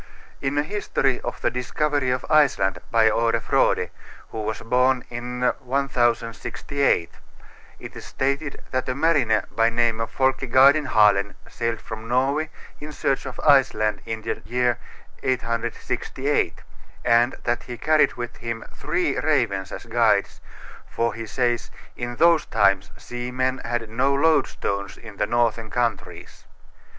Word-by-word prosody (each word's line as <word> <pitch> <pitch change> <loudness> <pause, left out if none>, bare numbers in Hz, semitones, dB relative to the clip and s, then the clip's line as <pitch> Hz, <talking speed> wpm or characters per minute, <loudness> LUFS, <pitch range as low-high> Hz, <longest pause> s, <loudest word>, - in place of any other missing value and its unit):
In 135 +1 -1
a 145 - +3
history 150 -8 -1
of - - -5
the - - +1
discovery 140 +2 -1
of 125 0 -1
Iceland, 135 - +3
by 115 -1 +4
Are 115 +1 +1
Frode, - - +1 0.4
who 110 - -5
was 110 +1 -4
born 125 +2 +2
in 125 +1 -5 0.2
1068, 125 -4 0 0.7
it - - -10
is - - -8
stated 140 +2 -2
that 130 0 -1
a 130 - -1
mariner 140 -8 +2
by 115 0 +3
name 115 -1 +1
of 115 - -3
Folke 130 -1 0
Gadenhalen 120 -7 +4
sailed 115 -1 -3
from 110 0 -8
Norway 135 +6 +1 0.3
in 150 +1 -8
search 135 -2 -1
of - - -8
Iceland 130 -7 +3
in 110 -1 -4
the - - -3
year 125 0 0 0.4
868, 120 - -2 0.4
and 120 +1 +4
that 120 0 0
he 120 - -8
carried 155 +3 +3
with 120 0 -6
him 115 -1 -5
three - - -1
ravens 95 -1 0
as - - -7
guides, 110 -3 +1 0.5
for 115 0 -1
he 115 0 -7
says, 120 -1 -1 0.3
"in 120 0 -5
those 170 +2 +4
times 100 -2 +2
seamen 125 +2 -3
had 115 -1 -3
no 130 +5 +1
loadstones 100 - 0
in 110 -4 -12
the - - 0
northern 115 -1 0
countries." 110 -6 -3
120 Hz, 140 wpm, -23 LUFS, 115-135 Hz, 0.7 s, by